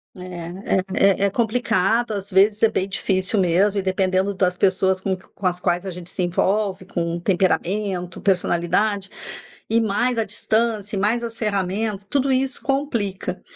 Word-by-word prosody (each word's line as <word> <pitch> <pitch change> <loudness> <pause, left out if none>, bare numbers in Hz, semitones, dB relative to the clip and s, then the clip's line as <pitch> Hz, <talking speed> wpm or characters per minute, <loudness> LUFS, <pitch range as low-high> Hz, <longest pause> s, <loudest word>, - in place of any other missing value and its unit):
É 185 - -11 0.7
é 195 - +5
é - - +4
é 200 - +3
complicado. 230 0 +1
Às 200 -1 -3
vezes, 205 +3 +3
é 225 - +5
bem 195 -3 -1
difícil 190 +1 +1
mesmo. 195 +3 +2
E - - 0
dependendo 190 +1 +1
das 180 -1 +1
pessoas 190 0 +2
com 190 -1 -1
q 185 - -18
com 190 - -2
as 180 0 -1
quais 175 +1 0
a 190 - -4
gente 180 0 -8
se 185 - -3
envolve. 190 +2 0
Com 170 -2 -2
temperamento, 185 0 -1
personalidade 195 +2 +1 0.6
e 230 +1 +3
mais 230 +3 0
a 225 - +1
distância 215 0 -1
e - - -1
mais 230 +4 +1
as 230 -1 -4
ferramentas, 200 0 -1
tudo 275 -1 +1
isso 260 0 0
complica. 230 -10 -2
195 Hz, 170 wpm, -22 LUFS, 185-220 Hz, 0.7 s, é